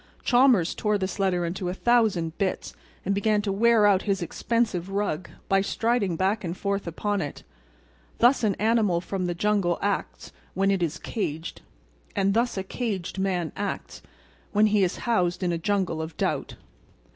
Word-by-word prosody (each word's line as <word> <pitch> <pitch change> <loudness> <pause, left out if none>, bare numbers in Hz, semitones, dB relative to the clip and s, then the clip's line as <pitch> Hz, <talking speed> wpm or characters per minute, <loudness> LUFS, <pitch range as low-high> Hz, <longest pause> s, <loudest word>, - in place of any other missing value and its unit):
Chalmers 245 -8 +4
tore 210 -1 0
this 190 0 -4
letter 180 -3 +1
into 180 +1 -3
a 180 - -3
thousand 205 -9 +2
bits 190 -2 -2 0.3
and 200 - +1
began 210 +1 +2
to 200 - -1
wear 225 +1 +4
out 195 -2 +4
his 195 -3 -1
expensive 205 -1 -1
rug 195 -4 -2 0.2
by 195 0 +3
striding 225 -2 0
back 195 +5 0
and 175 0 -4
forth 200 -2 -2
upon 205 +4 -1
it. 145 - -6 0.7
Thus 245 +2 +4
an 205 -3 +2
animal 215 -5 +2
from 185 +1 -3
the 175 - -2
jungle 195 -2 +1
acts 200 -1 -3 0.2
when 195 +1 +2
it 195 -2 0
is 165 -1 -1
caged, 165 -7 -4 0.5
and 195 0 +2
thus 235 0 +1
a 190 - -1
caged 195 -3 -4
man 180 -4 -1
acts 200 0 -4 0.5
when 210 +1 +5
he 205 -2 +4
is 180 - 0
housed 185 -6 +1
in 175 - +1
a 170 - -1
jungle 185 -3 0
of 160 +1 -7
doubt. - - -2
195 Hz, 170 wpm, -26 LUFS, 175-210 Hz, 0.7 s, when